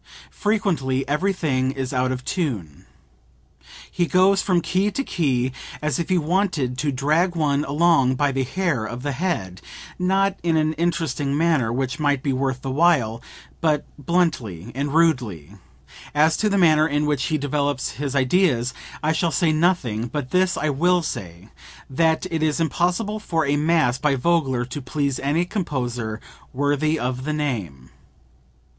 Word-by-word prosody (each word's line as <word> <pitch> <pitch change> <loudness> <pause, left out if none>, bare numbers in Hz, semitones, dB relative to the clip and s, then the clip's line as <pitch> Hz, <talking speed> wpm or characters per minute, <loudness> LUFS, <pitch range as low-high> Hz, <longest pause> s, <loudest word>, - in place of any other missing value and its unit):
Frequently 160 - 0
everything 150 -5 0
is 135 -1 -4
out 130 0 +1
of 130 0 -5
tune. 110 - -3 1.0
He 175 - 0
goes 190 +2 +4
from 180 -3 +2
key 185 +4 0
to 275 +7 -2
key 130 - 0 0.3
as 155 +2 -1
if 170 - -3
he 185 - +3
wanted 165 -6 0
to 150 -2 0
drag 155 +7 +1
one 145 -3 +1
along 145 -3 +3
by 145 +1 +1
the 135 0 -1
hair 165 -3 -1
of 120 +3 -6
the 145 - -1
head, 130 - -3 0.4
not 195 +2 +1
in 165 -2 +1
an 155 0 +1
interesting 155 -4 -1
manner 155 -8 +2
which 130 +3 -2
might 145 -3 +1
be 140 - 0
worth 130 0 -2
while, 135 -5 +2 0.4
but 150 -3 +1
bluntly 135 - -1
and 140 +3 -3
rudely. 120 - +1 0.6
As 155 +2 +4
to 215 - +1
the 200 - +1
manner 155 -4 +5
in 145 0 0
which 145 -3 0
he 155 - 0
develops 145 -1 -1
his 140 +3 -4
ideas 130 -3 +2 0.3
I 155 - +2
shall 165 +1 +1
say 165 0 +2
nothing; 155 - +1
but 135 0 -5
this 185 0 +2
I 155 - 0
will 175 +5 +2
say 90 - -6 0.4
that 160 +5 +2
it 160 -1 -1
is 155 0 +1
impossible 180 +6 0
for 165 -7 -1
a 140 +1 +1
mass 150 -5 +2
by 145 -1 +2
Vogler 135 -4 +1
to 130 +4 -6
please 140 0 -2
any 150 +6 0
composer 125 - -3 0.3
worthy 145 +3 +1
of 125 -1 -3
the 155 +2 -2
name. 105 - -4
145 Hz, 160 wpm, -22 LUFS, 130-170 Hz, 1.0 s, manner